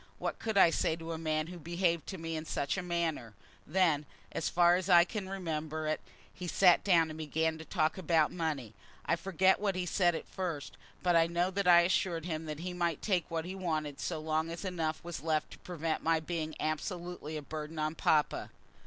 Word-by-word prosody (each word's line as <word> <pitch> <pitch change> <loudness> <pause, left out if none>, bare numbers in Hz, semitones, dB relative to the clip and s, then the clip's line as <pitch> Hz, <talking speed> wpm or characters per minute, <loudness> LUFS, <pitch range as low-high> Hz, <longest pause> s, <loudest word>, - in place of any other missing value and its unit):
What - - -3
could 220 -2 -2
I 170 -3 +7
say 160 - +1
to 165 0 -7
a 160 - -4
man 155 -1 0
who 175 +1 -9
behaved 170 +1 0
to 190 - -5
me 165 -1 -4
in 155 - -3
such 140 -3 -1
a 190 - -2
manner? 165 - -2 0.3
Then, 155 -4 +2 0.2
as - - -1
far 175 0 +5
as 185 +1 -2
I 175 -1 +8
can 190 +1 -5
remember 160 -4 -3
it, 155 0 -1 0.3
he 180 - -6
sat 175 +2 +5
down 170 -5 +4
and 155 - -8
began 160 +1 -1
to 160 - -8
talk 160 0 0
about 160 -3 +3
money. 150 - -3 0.3
I - - +2
forget 190 +1 +2
what 200 -2 0
he 185 -1 -1
said 175 -1 +2
at - - -6
first, 170 -7 -4 0.3
but 175 -1 +3
I 165 0 +5
know 175 +2 0
that 200 0 -1
I 175 -1 +8
assured 170 -2 0
him 160 -2 -3
that 155 0 -5
he 180 +1 -4
might 170 -3 -1
take 185 -5 0
what 165 -1 -2
he 185 - -5
wanted 155 -6 -2
so 170 - -2
long 155 +1 -1
as 170 +4 -6
enough 165 -4 -2
was 170 -6 -6
left 155 -1 0
to - - -11
prevent 165 -3 -3
my 165 0 +2
being 160 -1 -4
absolutely 160 0 -3
a 150 - -6
burden 155 +2 -6
on 155 0 0
papa. 155 -2 +1
165 Hz, 215 wpm, -32 LUFS, 155-180 Hz, 0.3 s, I